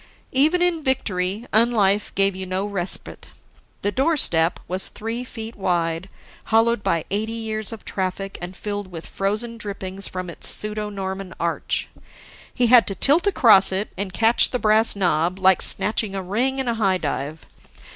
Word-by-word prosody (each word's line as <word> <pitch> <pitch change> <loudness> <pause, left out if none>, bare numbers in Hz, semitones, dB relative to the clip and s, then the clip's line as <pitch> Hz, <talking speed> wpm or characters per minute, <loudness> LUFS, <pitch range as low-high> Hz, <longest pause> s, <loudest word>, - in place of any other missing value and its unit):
Even 310 +7 +3
in 340 -3 0
victory, 205 -5 -1
unlife 210 -3 +3
gave 195 -1 +2
you 190 0 -5
no 185 +2 -2
respite. 195 -3 -3 0.6
The 205 - 0
doorstep 260 - +3
was 185 +1 -2
three 225 +3 -5
feet 225 -2 -8
wide, 175 -1 -2 0.4
hollowed 225 0 +2
by 165 -5 -1
eighty 215 +3 -1
years 220 -2 -4
of 225 - -10
traffic, 195 +1 -4
and 180 +1 -7
filled 205 -1 -4
with 165 -2 -8
frozen 215 +4 -3
drippings 195 -2 -6
from 185 0 -6
its 170 - -4
pseudo 210 0 -2
Norman 190 -1 -6
arch. 170 0 -2 0.6
He 245 - +1
had 240 0 +6
to 195 - -1
tilt 310 - +3
across 220 - +6
it 195 +3 -2
and 195 -1 -3
catch 225 +5 +3
the 250 - -2
brass 220 -1 +4
knob 175 -2 0
like 190 -1 +3
snatching 210 -1 +2
a 190 - -4
ring 240 +9 -1
in 265 -1 -1
a 235 - +1
high 195 -4 +1
dive. 150 -1 -5
205 Hz, 165 wpm, -22 LUFS, 185-230 Hz, 0.6 s, had